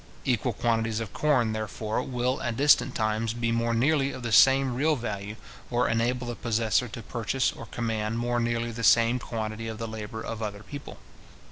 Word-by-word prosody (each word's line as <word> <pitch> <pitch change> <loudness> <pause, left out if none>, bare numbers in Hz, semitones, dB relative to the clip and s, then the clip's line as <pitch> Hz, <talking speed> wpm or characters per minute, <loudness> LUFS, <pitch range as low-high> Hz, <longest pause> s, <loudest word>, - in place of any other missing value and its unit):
Equal 125 -2 +1
quantities 115 0 0
of 115 -3 -6
corn, 125 -7 +2
therefore, 110 0 -3
will, 125 0 -1
at 115 -1 -2
distant 140 -3 +4
times, 110 +1 0
be 115 -1 -1
more 115 0 +1
nearly 140 +3 +2
of 130 - -8
the 120 - -3
same 135 +5 +6
real 150 +5 +2
value, 105 -4 -5 0.3
or 120 0 +1
enable 120 +2 0
the 120 - -3
possessor 115 +1 +1
to 115 0 -8
purchase 120 +3 -1
or 115 - -10
command 110 -1 -2
more 120 0 0
nearly 120 0 -1
the 115 +1 -6
same 115 +2 +5
quantity 110 -1 -4
of 110 -1 -5
the 115 +1 -4
labour 110 0 -6
of 115 -1 -5
other 105 -1 -5
people. 145 +3 -9
115 Hz, 190 wpm, -27 LUFS, 110-125 Hz, 0.3 s, same